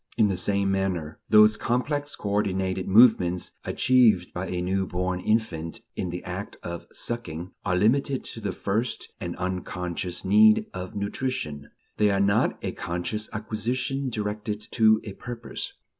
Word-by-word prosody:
In 110 Hz, -3 st, +4 dB
the 95 Hz, -, 0 dB
same 100 Hz, +1 st, +1 dB
manner, 90 Hz, -5 st, -1 dB
those 105 Hz, 0 st, +7 dB
complex 145 Hz, +6 st, -1 dB
coordinated 95 Hz, -2 st, -1 dB
movements 95 Hz, -5 st, +5 dB
achieved 115 Hz, -9 st, +3 dB
by 90 Hz, +2 st, -3 dB
a 90 Hz, -, -2 dB
new 95 Hz, +2 st, 0 dB
born 90 Hz, 0 st, -1 dB
infant 90 Hz, -6 st, -1 dB
in 90 Hz, -, -2 dB
the 90 Hz, +1 st, -5 dB
act 95 Hz, +3 st, -6 dB
of 85 Hz, 0 st, -6 dB
sucking, 95 Hz, -7 st, -5 dB
are 90 Hz, -2 st, +1 dB
limited 130 Hz, +7 st, +2 dB
to 115 Hz, -, -8 dB
the 100 Hz, -2 st, -2 dB
first 110 Hz, +6 st, -2 dB
and 85 Hz, -1 st, -4 dB
unconscious 90 Hz, -1 st, -3 dB
need 105 Hz, +2 st, +6 dB
of 90 Hz, 0 st, -6 dB
nutrition; 100 Hz, -, -3 dB, 0.3 s
they 105 Hz, -1 st, +4 dB
are 100 Hz, -1 st, +2 dB
not 100 Hz, 0 st, +2 dB
a -, -, -1 dB
conscious 90 Hz, +6 st, -3 dB
acquisition 125 Hz, +5 st, -2 dB
directed 105 Hz, -1 st, -3 dB
to 110 Hz, -2 st, +5 dB
a 100 Hz, -, -7 dB
purpose. 120 Hz, +2 st, -6 dB
100 Hz, 145 wpm, -26 LUFS, 90-110 Hz, 0.3 s, those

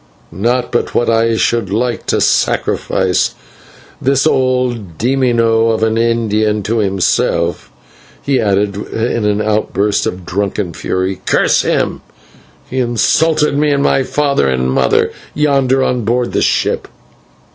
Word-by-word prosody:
Not 120 Hz, +7 st, -1 dB
but 120 Hz, -, -1 dB
what 120 Hz, -, +2 dB
I 115 Hz, 0 st, +2 dB
should 115 Hz, -4 st, 0 dB
like 120 Hz, +4 st, -2 dB
to -, -, +1 dB
sacrifice 95 Hz, -1 st, 0 dB, 0.7 s
this 135 Hz, +2 st, +1 dB
old 125 Hz, -, 0 dB
/demonio/ 115 Hz, -3 st, +2 dB
of 110 Hz, 0 st, -1 dB
an 110 Hz, 0 st, +1 dB
Indian 110 Hz, -2 st, 0 dB
to 115 Hz, +3 st, -1 dB
himself," 95 Hz, -3 st, 0 dB, 0.5 s
he 140 Hz, -2 st, +1 dB
added, 100 Hz, -1 st, 0 dB
in 115 Hz, +1 st, -2 dB
an 105 Hz, 0 st, +1 dB
outburst 105 Hz, -1 st, 0 dB
of 90 Hz, -1 st, -5 dB
drunken 100 Hz, -1 st, -2 dB
fury. 95 Hz, +3 st, -3 dB
"Curse -, -, +3 dB
him! -, -, -1 dB, 0.7 s
he 130 Hz, -, -3 dB
insulted 150 Hz, +6 st, +1 dB
me 150 Hz, +1 st, +2 dB
and 140 Hz, -1 st, +1 dB
my 135 Hz, -, +2 dB
father 140 Hz, -, 0 dB
and 65 Hz, 0 st, 0 dB
mother, -, -, +2 dB, 0.2 s
yonder 135 Hz, -3 st, +2 dB
on 125 Hz, -2 st, -1 dB
board 120 Hz, +3 st, 0 dB
the -, -, +1 dB
ship." -, -, 0 dB
115 Hz, 135 wpm, -15 LUFS, 100-125 Hz, 0.7 s, Curse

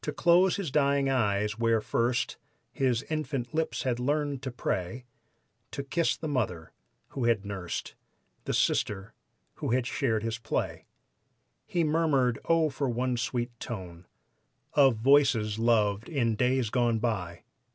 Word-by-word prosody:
To 150 Hz, -, -3 dB
close 175 Hz, +4 st, +4 dB
his 195 Hz, -8 st, -3 dB
dying 140 Hz, -1 st, +2 dB
eyes 105 Hz, -3 st, 0 dB
where 115 Hz, -1 st, +3 dB
first 120 Hz, +3 st, 0 dB, 0.3 s
His 130 Hz, -2 st, 0 dB
infant 145 Hz, -6 st, -3 dB
lips 160 Hz, 0 st, -1 dB
had 125 Hz, -3 st, -1 dB
learned 145 Hz, +1 st, -1 dB
to 135 Hz, -, -4 dB
pray, 120 Hz, -1 st, -3 dB, 0.6 s
To 140 Hz, -, -5 dB
kiss 160 Hz, +4 st, 0 dB
the 160 Hz, -, -5 dB
mother 100 Hz, -, -2 dB, 0.4 s
who 130 Hz, -4 st, -3 dB
had 115 Hz, -4 st, +2 dB
nursed 95 Hz, -3 st, -5 dB, 0.5 s
The -, -, -2 dB
sister 100 Hz, -1 st, 0 dB, 0.4 s
who -, -, -3 dB
had 125 Hz, -1 st, +1 dB
shared 115 Hz, -5 st, 0 dB
his 115 Hz, -1 st, -3 dB
play. 110 Hz, -, -3 dB, 0.8 s
He 175 Hz, -2 st, 0 dB
murmured: 150 Hz, -7 st, +2 dB
"Oh, 165 Hz, -2 st, +3 dB
for 135 Hz, 0 st, -2 dB
one 125 Hz, +1 st, 0 dB
sweet 120 Hz, 0 st, -2 dB
tone 90 Hz, -6 st, -7 dB, 0.7 s
Of 135 Hz, -4 st, +5 dB
voices 115 Hz, -4 st, +3 dB
loved 110 Hz, -2 st, +2 dB
in 120 Hz, -8 st, +1 dB
days 125 Hz, -1 st, +1 dB
gone 120 Hz, -2 st, +2 dB
by! 100 Hz, -7 st, -3 dB
125 Hz, 140 wpm, -28 LUFS, 110-140 Hz, 0.8 s, Of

